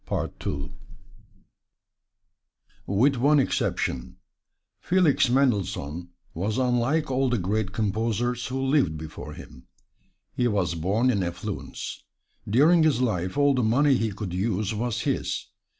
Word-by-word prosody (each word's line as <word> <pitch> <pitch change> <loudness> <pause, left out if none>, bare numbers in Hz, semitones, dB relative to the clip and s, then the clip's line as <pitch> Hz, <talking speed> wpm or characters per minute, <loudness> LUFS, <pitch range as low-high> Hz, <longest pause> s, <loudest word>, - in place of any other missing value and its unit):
With 125 +8 +3
one 145 +4 +4
exception, 65 - -1 0.6
Felix 175 -8 +3
Mendelssohn 95 - 0 0.2
was 105 +7 -2
unlike 130 +4 +1
all 130 0 +1
the 120 - +1
great 100 +1 -1
composers 115 +4 -1
who 130 +1 -3
lived 135 - +2
before 80 0 -8
him 65 - -13 0.7
he 120 - +1
was 100 -6 0
born 100 +10 +1
in 100 -5 0
affluence; 85 -1 -5 0.5
during 155 +10 +5
his 155 -6 +3
life 100 -5 -1
all 145 -1 +4
the 130 - +1
money 135 +5 +3
he 115 -3 0
could 95 -2 -6
use 100 +2 -1
was 115 +1 -2
his. - - -2
115 Hz, 120 wpm, -26 LUFS, 95-130 Hz, 0.7 s, during